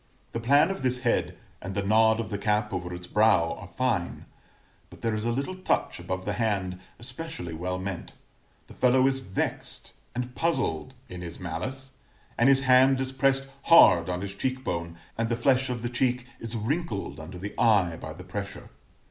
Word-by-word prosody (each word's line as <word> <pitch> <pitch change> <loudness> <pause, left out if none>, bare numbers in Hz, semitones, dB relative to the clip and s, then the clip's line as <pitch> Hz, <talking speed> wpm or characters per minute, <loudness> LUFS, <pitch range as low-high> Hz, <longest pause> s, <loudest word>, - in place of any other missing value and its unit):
The 115 - -3
plan 145 +9 +4
of 195 - -5
this 125 -1 0
head, 120 -2 0 0.2
and 95 +1 -6
the 100 - 0
nod 110 +2 +4
of 115 - -4
the 100 - -2
cap 105 0 0
over 90 0 -3
its 90 0 -6
brow, 105 -5 +3
are 90 - -9
fine; 110 -6 -1 0.6
but - - -15
there 115 -1 +1
is 110 +1 -2
a 120 - +1
little 140 +10 -2
touch 185 - 0
above 95 0 -4
the 105 - -1
hand 100 -4 -1 0.2
especially 120 - -6
well 90 +3 -3
meant: 95 -1 -5 0.5
the - - -14
fellow 130 +1 +4
is 135 0 +2
vexed 95 -8 -4 0.2
and 125 0 -3
puzzled 105 - -1
in 90 0 -8
his 85 -1 -7
malice; 130 +11 -5 0.4
and 125 +3 +4
his 135 0 +5
hand 130 0 +5
is 130 0 -2
pressed 135 0 +1 0.2
hard 90 - +7
on 90 0 -2
his 100 0 -5
cheek 130 +5 -2
bone, 85 -4 -3 0.2
and 115 0 +1
the 115 - +1
flesh 130 +1 +2
of 120 -2 -3
the - - 0
cheek 125 0 0
is 115 0 -6
wrinkled 110 - -2
under 85 +4 -8
the 100 +3 -6
eye 100 -7 +4
by - - -7
the - - -10
pressure. - - -6
115 Hz, 190 wpm, -27 LUFS, 90-130 Hz, 0.6 s, hard